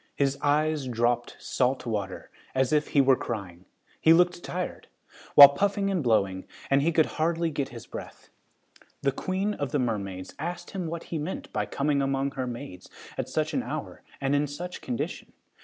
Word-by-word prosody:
His 140 -1 +1
eyes 150 -1 +1
dropped 120 0 0
salt 130 0 0
water, 100 -5 -4 0.2
as 130 +1 +2
if 150 0 +2
he 140 - +4
were 135 -1 +5
crying. 95 -8 -6 0.3
He 160 - +6
looked 175 +1 +3
tired, 180 0 -4 0.5
while 140 -1 +13
puffing 200 +6 0
and 185 -4 0
blowing, 100 -7 +1 0.3
and 140 0 +5
he 165 +4 +2
could 160 -1 +4 0.2
hardly 165 0 +1
get 140 -2 -2
his 115 -2 -10
breath. - - -9 0.7
The 140 - +3
queen 190 +8 -1
of 145 -8 -3
the - - +1
mermaids 100 -7 -3
asked 175 +4 -5
him 185 -4 -3
what 165 +1 -5
he 160 - 0
meant 155 +6 -5
by - - -1
coming 140 0 0
among 135 0 0
her 130 -2 -3
maids 120 -7 -8 0.3
at - - -3
such - - -1
an - - +1
hour - - -6 0.2
and 135 +1 0
in 145 +1 +2
such 175 +6 -6
condition. 120 -2 -4
140 Hz, 180 wpm, -27 LUFS, 120-165 Hz, 0.7 s, while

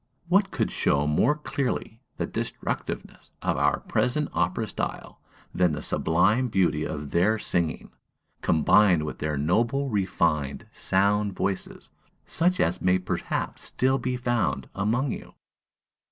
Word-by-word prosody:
What 195 +2 +4
could - - -1
show 70 +1 +1
more 75 - +3
clearly 135 -6 -3 0.2
the - - -1
destructiveness - - -5
of - - +1
our - - +1
present 140 +4 0
opera 90 +6 0
style - - -5 0.3
than 90 -3 +2
the - - -4
sublime 95 +10 +2
beauty 90 -8 +1
of 75 -2 -5
their 100 +6 +3
singing, 85 -6 -1 0.5
combined 85 +1 +4
with 75 - -5
their 75 -1 -1
noble, 115 - +1
refined, 85 -8 0
sound 100 +1 +1
voices, 95 0 -4 0.3
such 180 +3 +2
as 85 - +1
may 90 0 +3
perhaps 90 - -3
still 130 +1 +1
be 125 +1 -2
found 120 -2 0
among 115 +7 0
you? - - -8
100 Hz, 130 wpm, -26 LUFS, 85-125 Hz, 0.5 s, What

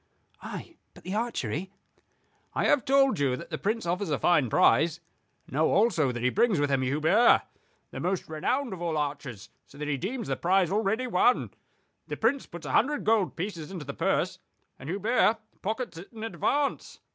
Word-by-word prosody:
"Ay; - - -8 0.2
but - - -15
the 185 - -5
archery?" 190 - -2 0.9
"I - - +1
have 280 - +3
told 270 - +3
you 135 -3 +2
that 170 - -10
the - - -3
Prince 220 +2 -1
offers 180 +2 -1
a 145 - +1
fine 150 -8 +3
prize. 160 +10 +3 0.5
Know 155 +4 +1
also 190 - +3
that 120 -1 -5
he 125 - +3
brings 220 -5 +2
with 145 -1 +1
him 135 -1 +2
Hubert, 155 - +4 0.5
the - - -6
most 185 +1 -2
renowned 240 - -1
of 180 - -8
all 165 -2 -1
archers: 140 -7 -4 0.2
so 140 - -16
that 150 0 -4
he 145 -2 0
deems 225 - -4
the - - 0
prize 185 0 +2
already 220 +4 0
won. 245 +2 +2 0.6
The - - -5
Prince 250 +5 +1
puts 170 -2 -9
a 135 - -4
hundred 290 - +2
gold 215 -4 +2
pieces 170 -3 -5
into 180 -6 -7
the 140 - -5
purse, - - 0 0.4
and 135 - -8
Hubert 215 +4 +2 0.2
pockets 220 -3 -3
it 180 - -12
in 220 -2 -9
advance." 280 +5 -1
180 Hz, 185 wpm, -28 LUFS, 150-225 Hz, 0.9 s, Hubert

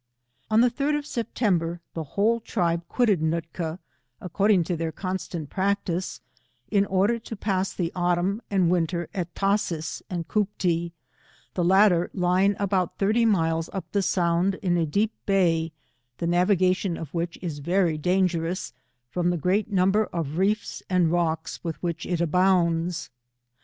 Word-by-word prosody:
On 220 +1 +5
the 245 0 +4
3d 290 +4 0
of 295 - -5
September, 195 - -1
the 165 - -3
whole 225 +3 +3
tribe 170 -7 0
quitted 215 -8 +2
Nootka, 165 +1 -2 0.4
according 195 +1 +2
to 175 +2 -2
their 165 0 -2
constant 180 -3 -5
practice, 190 -2 -1 0.5
in 200 -1 +3
order 200 +5 +2
to 225 - -7
pass 195 -2 -1
the 175 -2 -2
autumn 180 +4 +1
and 185 -4 +2
winter 175 -1 0
at 180 -4 -4
Tashees 195 -5 -1
and 175 -3 -4
Cooptee, 180 -5 0 0.6
the 180 - 0
latter 185 -1 +4
lying 185 +2 +2
abouMhirty 200 +4 +1
miles 165 -5 +1
up 190 - -5
the 200 - +1
Sound, 180 +1 +1
in 175 -2 +2
a 165 -2 +1
deep 205 +8 +1 0.2
bay, 165 -5 +2 0.5
the 170 - -3
navigation 180 +1 +2
of 160 -4 -8
which 170 0 -2
is 165 -5 -5
very 170 0 +1
dangerous, 180 +1 0 0.4
from 175 +2 0
the 175 - 0
great 195 +7 0
number 195 +3 +3
of 165 -3 -4
reefs 205 +3 0
and 180 -3 +3
rocks 165 -2 -1
with 165 -2 -3
which 170 -1 -3
it 175 -2 -1
abounds. 170 -4 +1
180 Hz, 145 wpm, -25 LUFS, 170-200 Hz, 0.6 s, On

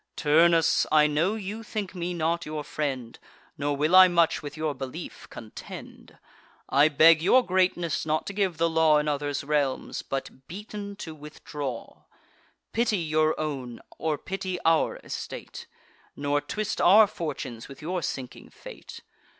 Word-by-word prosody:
Turnus, 165 +2 +4
I 150 -1 +6
know 155 +8 +1
you 210 +1 -5
think 210 -4 -5
me 175 -1 -4
not 170 +1 0
your 155 -1 -5
friend, 135 -6 -4 0.4
Nor 145 0 -2
will 155 +5 +2
I 185 0 +10
much 170 -2 +2
with 145 0 -8
your 155 -1 -1
belief 135 +5 -8
contend: 110 -2 -11 0.5
I 145 +2 +5
beg 155 +2 +6
your 250 +9 +4
greatness 180 -3 +1
not 155 0 -1
to 200 - -5
give 190 -4 0
the 165 +1 +2
law 160 -2 +4
In 150 0 0
others' 145 -1 -2
realms, 145 -2 -1
but, 135 -1 -6
beaten, 205 +2 -7
to 165 -5 -8
withdraw. 145 -4 -7 0.7
Pity 225 -2 +1
your 155 -2 +1
own, 135 -6 -4 0.2
or 155 -2 -1
pity 185 +2 -4
our 165 -1 +3
estate; - - -7 0.5
Nor 145 0 0
twist 215 +3 -3
our 210 +5 +7
fortunes 145 - -6
with 135 - -12
your 175 +3 -3
sinking 130 -5 -6
fate. - - -11
155 Hz, 150 wpm, -26 LUFS, 145-180 Hz, 0.7 s, I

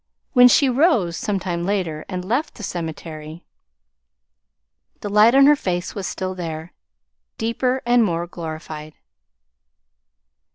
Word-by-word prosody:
When 250 -2 +8
she 270 +3 +4
rose 250 - +2
some 205 +2 -2
time 175 -2 -3
later 175 -5 -2
and 180 -2 -4
left 250 +10 -1
the 215 - -10
cemetery, 160 -2 -6 1.6
the 205 - -4
light 210 +4 +5
on 275 0 +7
her 295 +1 +7
face 180 -8 -3
was 195 -3 -4
still 185 0 -4
there, 165 -2 -6 0.6
deeper, 250 +3 -1
more 210 -9 +2
glorified. 155 -2 -8
185 Hz, 120 wpm, -21 LUFS, 165-235 Hz, 1.6 s, When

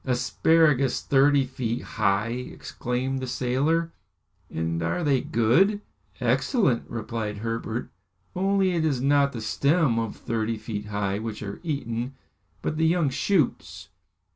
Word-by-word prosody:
"Asparagus 140 +1 +2
thirty 140 0 +4
feet 125 -3 -3
high!" 100 0 0
exclaimed 125 +1 -3
the 130 - -4
sailor. 135 +7 0 0.6
"And 80 +1 -2
are 85 - -1
they 140 -4 +2
good?" 150 - +3 0.4
"Excellent," 190 - +1
replied 110 -2 -4
Herbert. 115 +2 -4 0.4
"Only 195 0 +2
it 170 -2 0
is 145 -5 +1
not 140 +1 +3
the 115 - -6
stems 140 +2 +2
of 115 -2 -3
thirty 115 0 -2
feet 105 -1 -5
high 100 -1 -1
which 110 -1 -5
are 100 -1 -6
eaten, 135 -5 -3 0.5
but 155 - -2
the 160 0 +3
young 165 -4 +2
shoots." 155 +1 0
130 Hz, 130 wpm, -26 LUFS, 115-150 Hz, 0.6 s, thirty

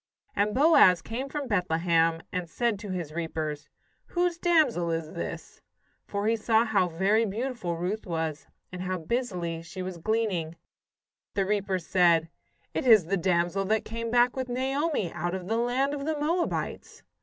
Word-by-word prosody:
And 210 +2 +1
Boaz 265 - +6
came 255 +5 -4
from 290 -1 -4
Bethlehem, 165 -4 +1
and 180 -2 -3
said 230 +3 0
to 205 -1 -8
his 175 -5 -4
reapers: 155 -3 -4 0.4
"Whose 350 -1 -1
damsel 300 - +3
is 165 -1 -2
this?" 80 -1 -6 0.5
for 200 0 -2
he 225 +1 +3
saw 225 +1 +2
how 200 -5 +2
very 195 +7 +2
beautiful 220 -4 -3
Ruth 190 +5 -3
was, 160 -3 -3 0.2
and 180 0 -6
how 185 0 -2
busily 175 -4 -2
she 165 +3 -7
was 180 -2 -6
gleaning. 190 -5 -1 0.8
The 195 - +1
reapers 195 -3 -1
said: 170 -3 +3 0.4
"It - - -2
is 215 -7 +7
the 195 +4 0
damsel 175 +1 +1
that 220 +2 +1
came 230 +1 -4
back 245 +1 +3
with 260 -1 -3
Naomi 265 - -1
out 175 +2 -2
of 185 -1 -5
the 225 +2 0
land 250 +4 +1
of 280 -1 -4
the 310 -1 -1
Moabites." 335 +4 -2
195 Hz, 165 wpm, -27 LUFS, 170-240 Hz, 0.8 s, is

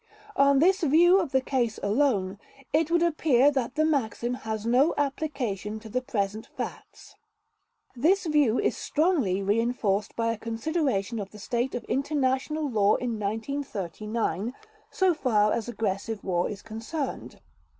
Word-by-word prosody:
On 280 0 +5
this 375 +7 +4
view 345 +5 +5
of 335 -8 -2
the 265 - +3
case 245 -4 -1
alone, 205 -4 +1 0.3
it 310 +1 +2
would 340 0 +3
appear 295 -5 +3
that 260 -3 -2
the 310 0 +2
maxim 250 -5 0
has 220 -3 -4
no 255 +7 +3
application 265 -8 -2
to 220 0 -11
the 255 +4 -1
present 210 -3 -3
facts. - - -7 0.8
This 350 +10 +2
view 295 -7 +3
is - - +1
strongly 285 - +1
reinforced 210 -1 0
by 230 0 0
a 225 - -5
consideration 230 - -1
of 200 -1 -5
the 210 - -13
state 240 +5 -2
of 245 - -4
international 280 +2 -1
law 210 -5 +3
in 235 -3 -3
1939, 220 - -3 0.3
so 380 -3 +2
far 215 -9 +2
as 235 0 -3
aggressive 215 -1 -3
war 175 -2 0
is 205 -1 -7
concerned. 230 +7 -5
240 Hz, 145 wpm, -27 LUFS, 215-290 Hz, 0.8 s, On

